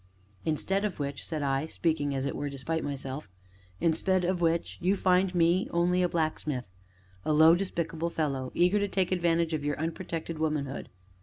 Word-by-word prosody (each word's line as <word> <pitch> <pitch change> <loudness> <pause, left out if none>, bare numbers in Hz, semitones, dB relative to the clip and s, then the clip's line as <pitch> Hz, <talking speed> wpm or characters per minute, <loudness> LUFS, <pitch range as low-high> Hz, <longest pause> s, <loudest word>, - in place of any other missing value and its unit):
"Instead 190 +6 0
of 205 -6 -2
which," 140 -1 -3
said 155 -3 -3
I, 135 +2 0
speaking 155 -4 0
(as 135 0 -1
it 140 - -2
were), 145 - -3
despite 140 +4 -3
myself, 140 -2 -5 0.5
"instead 180 +3 +2
of 180 0 0
which, 165 0 0
you 185 +3 +3
find 185 -1 +2
me 175 +2 +3
only 175 +1 +2
a 180 - +2
blacksmith 155 - -2 0.5
a - - 0
low, 160 +2 +7
despicable 170 -3 -1
fellow 140 -6 -2
eager 180 +4 +4
to 205 - +1
take 190 -2 0
advantage 170 -2 +2
of 155 -2 -1
your 145 0 -1
unprotected 165 0 -4
womanhood." 150 -3 -2
165 Hz, 170 wpm, -29 LUFS, 145-180 Hz, 0.5 s, low